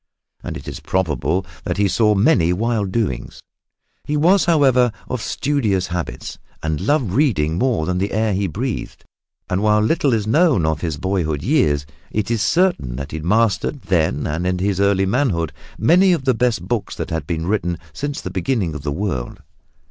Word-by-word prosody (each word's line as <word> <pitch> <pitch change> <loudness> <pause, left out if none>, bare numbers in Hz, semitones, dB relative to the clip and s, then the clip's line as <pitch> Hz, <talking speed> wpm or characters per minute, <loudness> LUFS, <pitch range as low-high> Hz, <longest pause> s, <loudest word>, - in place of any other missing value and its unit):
And - - -5
it - - -11
is - - -6
probable 85 -1 -1 0.2
that - - -2
he 100 0 +3
saw 105 +2 +3
many 95 - +3
wild 105 0 0
doings. 95 - -2 0.6
He 150 - -1
was, 180 +6 +4
however, 135 -7 +4 0.2
of 125 - -3
studious 110 -12 0
habits 85 -9 -5 0.2
and 80 -1 -1
loved 140 -9 +1
reading 95 - +1
more 120 -11 +1
than 90 +1 -1
the 100 +2 -1
air 110 0 +1
he 95 +1 0
breathed. 115 - -4 0.4
And 95 +1 -1
while 105 0 +3
little 140 +6 +2
is 110 -3 +1
known 140 - +3
of 80 -1 -1
his 80 -4 -2
boyhood 80 -5 -1
years, 75 - +2 0.2
it 110 +1 -2
is 115 -3 0
certain 165 - +1
that 70 +2 -6
he 80 - -4
mastered 110 - +1
then 80 -6 +1
and 80 +4 -2
in 90 0 0
his 95 +1 0
early 100 -1 +3
manhood 95 - 0 0.2
many 180 - +5
of 150 -6 -2
the 130 - +4
best 115 -5 0
books 115 -1 -2
that - - -5
had 80 -3 -3
been 80 -1 -2
written 90 -3 -1 0.2
since 145 0 -4
the - - -6
beginning 110 - -1
of 75 - -6
the 75 0 -3
world. 75 -7 -3
100 Hz, 185 wpm, -20 LUFS, 85-125 Hz, 0.6 s, many